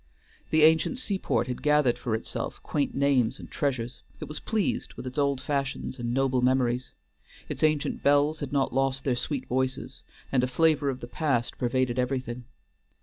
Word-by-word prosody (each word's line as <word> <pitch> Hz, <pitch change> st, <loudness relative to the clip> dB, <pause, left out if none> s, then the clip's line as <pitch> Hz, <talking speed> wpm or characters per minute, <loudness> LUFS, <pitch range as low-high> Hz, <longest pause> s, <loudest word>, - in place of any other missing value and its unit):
The 155 Hz, -1 st, +4 dB
ancient 160 Hz, -, +4 dB
seaport 200 Hz, -7 st, 0 dB
had 125 Hz, -1 st, -5 dB
gathered 150 Hz, -4 st, +3 dB
for 115 Hz, -3 st, -1 dB
itself 110 Hz, -, -4 dB
quaint 145 Hz, -2 st, -1 dB
names 135 Hz, -4 st, +2 dB
and -, -, -11 dB
treasures; 125 Hz, -5 st, -2 dB, 0.2 s
it -, -, -6 dB
was 150 Hz, -1 st, -6 dB
pleased 220 Hz, -3 st, -1 dB
with -, -, -8 dB
its 130 Hz, +3 st, -4 dB
old 140 Hz, -2 st, +2 dB
fashions 135 Hz, -2 st, -3 dB
and 120 Hz, 0 st, -2 dB
noble 130 Hz, 0 st, +2 dB
memories; 125 Hz, -1 st, +1 dB, 0.6 s
its -, -, -5 dB
ancient 155 Hz, -2 st, +1 dB
bells 145 Hz, +2 st, +3 dB
had 145 Hz, -3 st, -5 dB
not 140 Hz, -2 st, +1 dB
lost 135 Hz, 0 st, +1 dB
their 130 Hz, -3 st, +1 dB
sweet 135 Hz, +2 st, -3 dB
voices, 130 Hz, +1 st, -2 dB, 0.3 s
and 130 Hz, -2 st, +3 dB
a -, -, +2 dB
flavor 150 Hz, +2 st, +3 dB
of 130 Hz, -2 st, -4 dB
the 120 Hz, -, -6 dB
past 125 Hz, -4 st, -1 dB
pervaded 125 Hz, 0 st, +1 dB
everything. 125 Hz, -1 st, -2 dB
135 Hz, 175 wpm, -27 LUFS, 125-145 Hz, 0.6 s, The